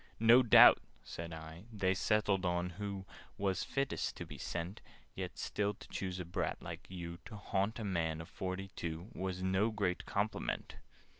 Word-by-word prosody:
"No 115 +3 +8
doubt," 120 - +9 0.2
said 85 0 -6
I, 80 +3 -8
"they 95 -3 +1
settled 100 -1 +2
who 90 +3 -2 0.3
Was 95 -2 0
fittest 135 0 -1
to - - -5
be - - -10
sent 85 +3 -4 0.3
Yet - - -5
still 105 0 -1
to - - -13
choose 95 -1 -3
a 90 - -4
brat 85 - -2
like - - -8
you, 85 -2 -6
To 110 - -8
haunt 100 +1 -1
a 115 - -4
man 85 -5 0
of 80 - -7
forty 95 +1 -4
two, 85 +2 -5
Was 95 0 -3
no 95 +4 +2
great 100 -5 -1
compliment!" 105 +2 -2
95 Hz, 165 wpm, -35 LUFS, 85-105 Hz, 0.3 s, doubt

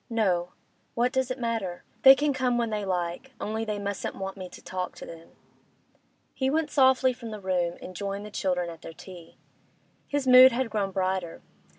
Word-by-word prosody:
'No. 185 -6 0 0.4
What 245 +2 +2
does 260 -1 0
it 255 - -3
matter? 225 -8 -3 0.2
They 270 0 +10
can 290 +1 0
come 255 -2 0
when 235 -2 -1
they 210 -1 -2
like, 180 +7 -3
only 220 +1 -3
they 210 -2 -3
mustn't 200 0 -4
want 195 0 -5
me 185 -2 -8
to - - -12
talk 185 -1 -5
to - - -9
them.' 165 0 -12 1.0
He 265 -1 0
went 310 +1 0
softly 260 -1 +4
from 240 -2 -9
the 215 -1 -7
room, 180 -3 -1
and 185 - -9
joined 200 +2 -4
the 210 - -9
children 180 -4 -1
at 165 0 -12
their 165 - -9
tea. 175 0 -13 0.7
His 285 -1 -1
mood 255 0 +9
had 250 -1 -1
grown 205 -3 -1
brighter. 185 -2 -2
210 Hz, 195 wpm, -27 LUFS, 185-255 Hz, 1.0 s, They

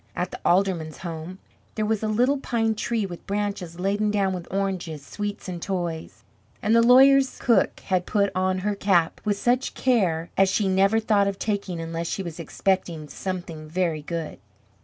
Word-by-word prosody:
At 180 +1 -2
the - - -7
alderman's 175 -4 +1
home 170 +1 -6 0.4
there 215 - 0
was 220 -1 0
a 220 - -1
little 250 +6 +2
pine 225 -4 0
tree 220 0 -1
with 175 -3 -9
branches 200 -4 -3
laden 205 +3 +1
down 200 -2 +1
with 180 -2 -7
oranges, 180 -6 -3
sweets, 205 +3 -5
and 175 -2 -5
toys. 175 -4 -4 0.4
And 215 +2 +2
the 230 - +6
lawyer's 265 +3 +6
cook 225 -6 +2
had 185 -2 -1
put 200 -2 +1
on 185 0 +1
her 210 - +1
cap 190 -5 +1
with 205 -1 0
such 245 +4 0
care 180 -10 +1
as 195 0 +4
she 200 +1 +1
never 195 +3 +3
thought 210 -2 +2
of 200 -1 -2
taking 200 -5 -2
unless 165 0 -4
she 195 - -3
was 170 -2 -7
expecting 170 -2 -1
something 175 -2 -5
very 165 -2 -1
good! 165 +1 -5
190 Hz, 180 wpm, -25 LUFS, 170-210 Hz, 0.4 s, the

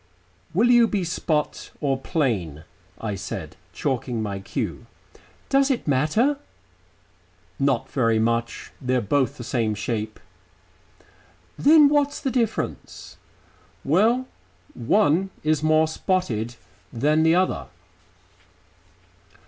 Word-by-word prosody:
"Will 225 +9 +3
you 240 -1 +6
be 205 -4 -1
spot 155 -3 -2
or 140 -3 +1
plain?" 110 - -2 0.4
I 110 -2 -3
said, 95 0 -6 0.2
chalking 125 -3 -2
my 100 -2 -3
cue. 95 - -5 0.6
"Does 275 +1 +3
it 260 - -1
matter?" 155 - +2 1.2
"Not 135 -4 +1
very 115 -4 +2
much. 115 +1 -1
They're 130 0 +1
both 135 +5 0
the 120 - -7
same 115 -3 -1
shape." 110 0 -4 1.4
"Then 300 0 +6
what's 290 0 +1
the 270 - -2
difference?" 235 -4 -3 0.7
"Well, 220 - +3 0.5
one 190 - +2
is 155 -1 +1
more 155 0 +3
spotted 125 - -1 0.4
than 150 +6 +2
the 160 +1 +4
other." 185 +1 0
145 Hz, 105 wpm, -24 LUFS, 115-195 Hz, 1.4 s, you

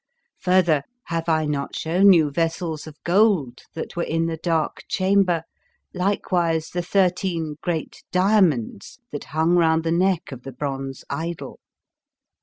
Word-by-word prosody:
Further, 180 -5 +3 0.3
have 165 0 -2
I 155 -1 +2
not 145 -2 -3
shewn 180 +5 +4
you 160 -5 +4
vessels 165 0 -2
of 155 - -10
gold 175 - +2 0.2
that 160 - -5
3 175 - -2
Introduction - - -4
were - - +1
in 165 0 +1
the 165 -1 -2
Dark 165 -2 -1
Chamber, 185 -3 +2 0.5
likewise 180 -4 0
the 175 - -1
thirteen 175 -4 0
great 170 -3 -4
diamonds 180 - +1
that 145 - -6
hung 160 +3 +1
round 160 -1 +3
the 165 - -1
neck 180 -1 +1
of 130 -2 -8
the 135 +1 -9
bronze 135 0 -5
idol? 165 +4 -5
165 Hz, 150 wpm, -23 LUFS, 155-180 Hz, 0.5 s, shewn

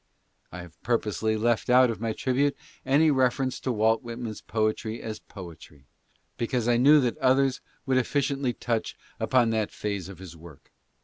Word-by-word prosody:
I 90 - -7
have 85 -1 -14
purposely 110 -2 0
left 115 +1 0
oat 125 0 +6
of 110 -2 -7
my 115 -1 -1
tribute 135 +5 0 0.3
any 150 +3 +4
reference 130 -1 +1
to 130 - -2
Walt:. 110 0 +2
nan? 120 0 -6
s 110 -2 -6
poetry 110 0 -2
as 110 -1 -6
poetry, 80 -6 -12 0.5
because 120 0 -1
I 120 -1 +3
knew 145 +5 +6
that 125 -2 -1
others 135 0 +2 0.2
would 130 -2 +1
efficiently 135 0 0
touch 115 -2 -3 0.2
upon 120 -3 +2
tha: 110 -2 0
phase 100 -3 -4
of 95 - -10
his 90 -3 -11
work. 80 -3 -15
115 Hz, 170 wpm, -26 LUFS, 110-130 Hz, 0.5 s, oat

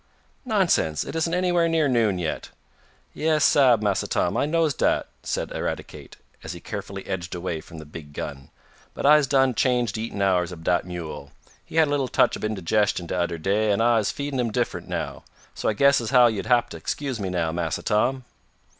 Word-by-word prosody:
"Nonsense! 185 - +1
It - - -7
isn't 165 +1 0
anywhere 175 -2 +2
near 160 -2 +2
noon 115 -7 +2
yet." 85 -3 -3 0.6
"Yais, 155 -1 +1
sab, 125 -6 +5
Massa 100 -2 0
Tom, 90 - 0
I - - +1
knows 160 -1 +2
dat," - - +1 0.2
said - - -3
Eradicate, - - -5 0.3
as - - -5
he - - -9
carefully 95 0 -7
edged 90 -1 -4
away 85 -2 -4
from 85 - -13
the 80 - -9
big 75 0 -10
gun, 70 -2 -7 0.5
"but - - -4
I'se 150 -1 +6
done 135 -1 +3
changed 120 -3 +1
de 110 - -3
eatin' 115 -2 -5
hours 90 -2 +2
ob 85 -2 -9
dat 90 +1 +1
mule. 85 -5 -7 0.3
He - - -12
had 160 -1 +5
a - - -3
little 140 -2 +1
touch - - +2
ob - - -9
indigestion 105 -2 0
de 85 - -4
udder 85 -1 -1
day, 105 +6 +1
an' 100 - +1
I'se 115 -2 +3
feedin' 140 -2 -4
him 120 -2 +1
diff'rent 120 +2 -2
now. - - -4 0.3
So - - -1
I - - +1
guess 140 +5 +4
as 115 - -4
how 125 -2 +6
yo'll 110 -4 0
hab 120 -1 +3
t' 80 - -7
'scuse 135 - -3
me 95 -2 -3
now, 85 -3 -1
Massa 85 -1 -2
Tom." 125 +5 +1
110 Hz, 205 wpm, -24 LUFS, 90-140 Hz, 0.6 s, I'se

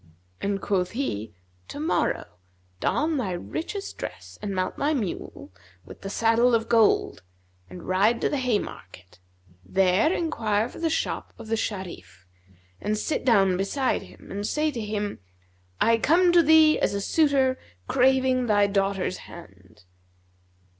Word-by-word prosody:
and 200 -1 -2
quoth 185 -1 0
he, 115 - -3 0.4
'Tomorrow 310 +3 -1 0.5
don 310 - 0
thou 255 - -1
thy 190 - -3
richest 330 - -5
dress - - -8
and 200 -2 -3
mount 185 0 -1
thy 300 +2 +1
mule, 180 - -5 0.3
with - - -13
the 195 - -5
saddle 230 +3 +3
of 225 0 -1
gold 225 - +3 0.5
and 90 - -10
ride 205 +6 +2
to - - +1
the 285 - -1
Haymarket. 90 - -4 0.4
There 190 - +2
enquire 225 - 0
for - - -11
the 330 -1 0
shop 320 - -2
of 220 - -10
the 225 - +1
Sharif[FN#234] 190 -5 -4 0.8
and 215 +1 -1
sit 300 - -2
down 195 -7 +4
beside 255 +8 0
him - - -14
and 205 +1 -3
say 305 0 0
to 240 -5 -5
him, 210 -1 -3 0.6
'I 230 0 +3
come 345 +8 +4
to 345 0 +6
thee 315 0 +5
as - - 0
a - - -1
suitor 270 0 +2 0.3
craving 260 -1 +2
thy 205 -2 +4
daughter's 195 -2 0
hand.' 95 - -14
225 Hz, 145 wpm, -25 LUFS, 195-275 Hz, 0.8 s, to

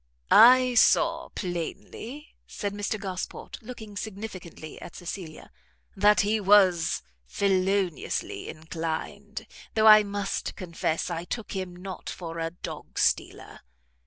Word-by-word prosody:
"I 250 +2 +8
saw 245 - +4
plainly," 200 - -5 0.2
said 200 -2 -4
Mr 205 +1 -2
Gosport, 190 -3 -6
looking 220 -3 -9
significantly 195 -7 -7
at - - -10
Cecilia, 175 -2 -7 0.4
"that 205 0 +5
he 210 +2 +1
was 190 -4 +4 0.2
feloniously 190 - 0
inclined, 165 +7 -5 0.3
though 220 0 +3
I 215 -1 +10
must 200 -1 -3
confess 170 -1 -2
I 170 0 -3
took 220 +5 -5
him 185 -2 -4
not 185 +1 -7
for 165 -2 -6
a 165 0 -1
dog 175 - -9
stealer." - - 0
195 Hz, 115 wpm, -27 LUFS, 175-210 Hz, 0.4 s, I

